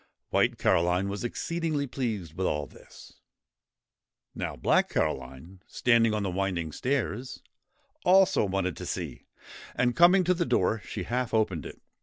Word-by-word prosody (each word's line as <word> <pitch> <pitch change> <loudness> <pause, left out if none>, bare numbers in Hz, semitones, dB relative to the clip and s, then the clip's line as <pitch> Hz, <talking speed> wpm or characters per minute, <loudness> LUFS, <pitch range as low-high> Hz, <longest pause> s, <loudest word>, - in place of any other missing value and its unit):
White - - +2
Caroline 90 +3 +2
was 100 +3 -4
exceedingly 155 +3 -2
pleased 110 - -4
with 95 +2 -1
all 75 -1 -1
this. - - -16 1.1
Now - - -4
Black - - +2
Caroline, 65 +9 -3
standing 115 -2 +3
on 105 -1 -1
the 95 - -2
winding 90 -4 -2
stairs, 125 - -3 0.6
also 190 - +5
wanted 95 -3 -1
to - - -6
see; - - -5 0.5
and, 125 0 +1
coming 180 +2 +6
to 180 +1 +3
the 175 -1 0
door, 110 - +1
she 100 - -5
half 120 +2 -2
opened 95 -8 0
it. - - -12
105 Hz, 145 wpm, -28 LUFS, 90-130 Hz, 1.1 s, coming